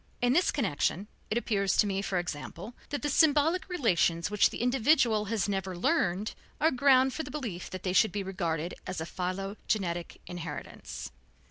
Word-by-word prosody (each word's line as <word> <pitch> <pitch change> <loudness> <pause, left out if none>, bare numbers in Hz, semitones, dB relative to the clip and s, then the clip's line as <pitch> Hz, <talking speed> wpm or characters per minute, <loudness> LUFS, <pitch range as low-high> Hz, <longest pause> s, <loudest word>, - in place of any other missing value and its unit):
In 245 0 +3
this 350 +4 +3
connection 200 - 0 0.2
it 215 - 0
appears 200 -5 +1
to - - +5
me, 195 -1 -1
for 195 -2 -1
example, 175 +5 -5 0.2
that 290 - -3
the - - +1
symbolic 315 +5 +3
relations 180 - +1
which 210 - +4
the - - -4
individual 245 -3 +3
has 215 -1 0
never 190 -2 -2
learned 205 - +1 0.3
are 320 +2 +4
ground 260 0 +4
for - - -3
the - - -7
belief 230 -12 -5
that 185 -1 -7
they 185 - -1
should 220 +3 +4
be 205 -1 -2
regarded 175 -3 -2
as 185 -1 -3
a 160 - -3
philogenetic 185 -1 -3
inheritance. 175 - -7
205 Hz, 170 wpm, -29 LUFS, 180-255 Hz, 0.3 s, to